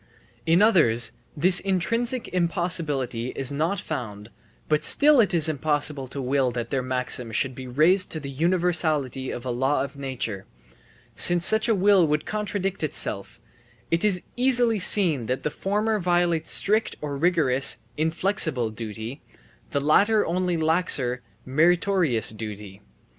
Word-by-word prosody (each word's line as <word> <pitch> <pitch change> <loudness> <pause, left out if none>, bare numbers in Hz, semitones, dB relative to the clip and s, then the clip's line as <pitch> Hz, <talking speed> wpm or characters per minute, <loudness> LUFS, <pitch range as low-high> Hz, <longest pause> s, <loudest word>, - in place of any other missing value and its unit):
In 170 +5 +4
others 120 - +3 0.3
this 175 +4 +5
intrinsic 230 +6 -1
impossibility 165 -9 -1
is 135 0 -2
not 160 +7 -2
found, 110 -9 -7 0.4
but 150 -1 0
still 295 -1 +4
it 215 - +3
is 165 -3 +3
impossible 145 -2 -1
to 140 - -8
will 135 0 0
that 120 -1 -5
their 135 - -1
maxim 125 -2 -3
should 130 +4 -1
be 130 +1 -9
raised 165 +9 +2
to 160 - -4
the 140 -2 -8
universality 155 -5 -1
of 120 - -7
a 125 - -3
law 130 +3 0
of 140 0 -8
nature, 120 -8 -5 0.7
since 175 0 +5
such 220 +2 +2
a 225 - +3
will 195 -3 +3
would 150 0 -1
contradict 205 -2 -4
itself 105 -8 -3 0.5
It 165 +3 +1
is 195 -4 +2
easily 245 -3 +2
seen 165 - +4
that 130 +1 -3
the 150 - -2
former 210 +2 -2
violate 175 -2 0
strict 215 +2 +1
or 145 -2 -5
rigorous 140 -4 +3 0.2
(inflexible) 160 - +1
duty; 110 +4 -8 0.5
the 140 - -2
latter 205 +9 +2
only 180 0 -2
laxer 155 -6 0 0.3
(meritorious) 165 - +1
duty. 105 -2 -9
155 Hz, 140 wpm, -23 LUFS, 130-185 Hz, 0.7 s, this